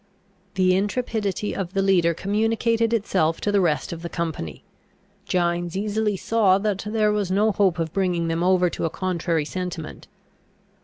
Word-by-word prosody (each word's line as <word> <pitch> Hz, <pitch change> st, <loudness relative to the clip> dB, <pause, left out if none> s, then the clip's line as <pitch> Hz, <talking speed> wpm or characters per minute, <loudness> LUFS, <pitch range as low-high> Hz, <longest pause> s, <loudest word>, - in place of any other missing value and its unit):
The 185 Hz, -1 st, +3 dB
intrepidity 210 Hz, -1 st, -1 dB
of 190 Hz, -2 st, -4 dB
the 195 Hz, -1 st, +1 dB
leader 175 Hz, -4 st, +3 dB
communicated 225 Hz, +4 st, +1 dB
itself 185 Hz, -8 st, +1 dB
to 205 Hz, -, 0 dB
the 200 Hz, -1 st, +3 dB
rest 165 Hz, -2 st, 0 dB
of 165 Hz, -, -8 dB
the 170 Hz, -, -5 dB
company. 160 Hz, -, -4 dB, 0.6 s
Gines 175 Hz, 0 st, 0 dB
easily 210 Hz, 0 st, 0 dB
saw 205 Hz, -3 st, +3 dB
that 200 Hz, -1 st, -1 dB
there 215 Hz, -1 st, +2 dB
was 205 Hz, -3 st, -1 dB
no 205 Hz, +3 st, +3 dB
hope 195 Hz, -4 st, +2 dB
of 165 Hz, -2 st, -3 dB
bringing 180 Hz, -4 st, 0 dB
them 165 Hz, 0 st, -1 dB
over 180 Hz, 0 st, +3 dB
to -, -, -3 dB
a -, -, 0 dB
contrary 170 Hz, -3 st, -1 dB
sentiment. 180 Hz, -2 st, -6 dB
190 Hz, 160 wpm, -23 LUFS, 170-210 Hz, 0.6 s, The